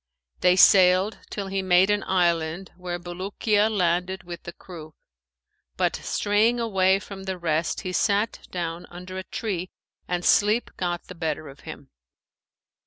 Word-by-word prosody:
They 180 0 +4
sailed 185 +2 +5
till 200 - -4
he 195 0 -2
made 185 +1 +4
an 205 -1 +1
island, 170 -1 0
where 180 -1 -5
Bulukiya 200 +4 0
landed 185 -1 0
with 175 -1 -8
the 170 - -8
crew, 160 -4 -11 0.8
but - - +1
straying 215 +4 +1
away 195 -4 +3
from 195 -1 -9
the 190 -1 -3
rest 165 -2 -1
he 185 - -5
sat 205 +3 0
down 170 -1 -4
under 180 +2 -8
a - - -6
tree 185 -4 -4 0.4
and 175 -1 -2
sleep 210 +3 +3
got 175 -1 -2
the - - -10
better 160 -3 -3
of 135 - -14
him. 140 -1 -10
185 Hz, 150 wpm, -25 LUFS, 175-195 Hz, 0.8 s, sailed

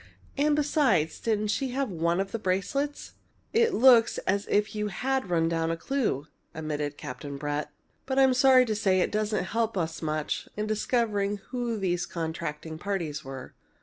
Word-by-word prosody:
And 295 +1 +2
besides, 265 - +2
didn't 215 -2 0
she 240 +6 0
have 270 -4 -1
one 170 +1 0
of 195 0 -2
the 230 - -3
bracelets?" 215 +10 -2 0.4
"It 460 +1 +4
looks 235 -2 +6
as 200 +1 0
if 210 +1 +1
you 210 0 -2
had 260 +2 -1
run 165 -2 +2
down 165 0 0
a 165 - -1
clue," 230 - -1 0.3
admitted 150 -2 -3
Captain 140 +3 -7
Brett. 145 +1 -3 0.4
"But 265 0 -1
I'm 265 -1 +6
sorry 255 0 +6
to 220 - -1
say 195 -3 +2
it - - 0
doesn't 215 -1 0
help 225 +2 -1
us 165 -2 -2
much 155 -1 -2
in 210 - -1
discovering 215 -2 0
who 240 -2 -2
these 180 -3 -1
contracting 160 -1 -5
parties 170 -7 -3
were. 135 -1 -8
200 Hz, 170 wpm, -28 LUFS, 165-245 Hz, 0.4 s, looks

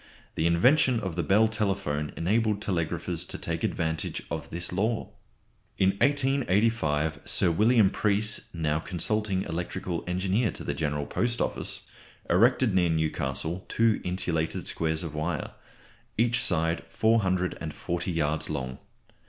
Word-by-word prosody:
The 80 - +1
invention 125 - +4
of 95 -6 -4
the 85 - 0
Bell 105 +5 +4
telephone 95 -9 -1
enabled 105 +4 +1
telegraphers 90 -6 -2
to - - -5
take - - -4
advantage 80 -1 -2
of - - -4
this 85 +1 -4
law. 110 +4 -1 0.7
In 95 - +4
1885 115 - +2
Sir 85 - +3
William 110 +2 +4
Preece, 105 +1 +1
now 80 -2 0
consulting 95 +3 -1
electrical 85 0 -4
engineer 95 +5 +1
to - - -8
the - - -2
General 75 -2 -2
Post 120 +8 -1
Office, - - -2 0.5
erected 115 +4 +4
near 90 -2 +3
Newcastle 80 +1 -1
two 115 -2 +2
insulated 90 -3 -2
squares 80 0 -1
of 80 -3 -5
wire, 75 -1 -2 0.7
each 120 +1 +2
side 80 -2 +1
440 90 -4 0
yards 80 -2 -1
long. 65 -4 -4
90 Hz, 130 wpm, -27 LUFS, 80-110 Hz, 0.7 s, invention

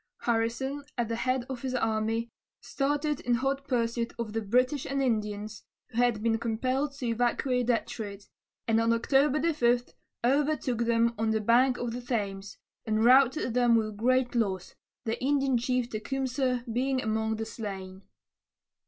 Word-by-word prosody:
Harrison, 240 +5 -1
at 235 -2 -1
the 230 - -1
head 255 +1 0
of 260 -3 -6
his 260 -1 -3
army, 225 0 0 0.3
started 290 +1 -1
in 240 0 +1
hot 270 +3 -1
pursuit 235 -2 -1
of 225 -2 -4
the 225 - -1
British 250 +6 +1
and 275 0 -1
Indians, 215 -4 -2 0.3
who 230 - -9
had 240 -3 +2
been 225 -1 +2
compelled 255 +5 -1
to 275 -2 -6
evacuate 245 +1 0
Detroit, 210 -4 -2 0.4
and 225 0 +3
on 230 0 +3
October 270 +5 +2
5 240 -3 +1 0.3
overtook 270 -2 +1
them 230 0 +2
on 225 0 +1
the 220 0 +1
bank 245 +4 +3
of 240 -1 -3
the 245 - -4
Thames, 205 -5 -3 0.3
and 220 0 +1
routed 260 0 +5
them 240 -1 +4
with 215 -2 0
great 255 +2 +2
loss, 195 -6 -1 0.3
the 225 +2 -2
Indian 275 -1 +2
chief 250 0 0
Tecumseh 255 +2 -1
being 260 +2 +1
among 220 -1 -1
the 220 +1 -4
slain. 195 -4 -7
240 Hz, 155 wpm, -29 LUFS, 225-260 Hz, 0.4 s, routed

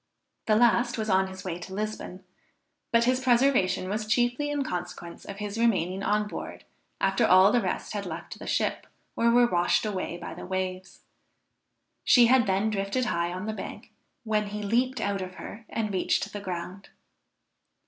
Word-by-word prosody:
The 215 - +4
last 240 +1 +3
was 220 -2 -1
on 190 0 +3
his 190 0 -9
way 175 -2 -4
to 190 +2 -8
Lisbon; 210 -3 -5 0.7
but 230 0 +4
his 255 +1 +2
preservation 245 -8 +2
was 215 +2 -3
chiefly 245 +6 +1
in 290 -1 -1
consequence 175 -4 -6
of 200 - -7
his 210 +1 -4
remaining 190 -5 +1
on 210 +1 +1
board - - -7 0.4
after 195 0 +2
all 185 +2 +6
the 245 - +3
rest 185 +1 -3
had 200 -2 -3
left 170 0 -7
the - - -8
ship, - - -1 0.3
or 235 - +3
were 240 +1 +5
washed 175 -2 +2
away 185 -4 -3
by 175 - -7
the 170 - -9
waves. 185 0 -4 1.0
She 245 -2 +6
had 240 -2 +4
then 195 +3 +1
drifted 200 +5 -1
high 170 -6 -1
on 185 +3 -5
the 220 - -2
bank, - - -8 0.3
when 215 -2 0
he 210 +1 -5
leaped 245 +5 +1
out 200 -1 -1
of 185 0 -6
her 225 +4 -9
and 215 -3 -2
reached 190 +2 0
the 205 - -4
ground. 185 +1 -6
205 Hz, 180 wpm, -27 LUFS, 185-235 Hz, 1.0 s, all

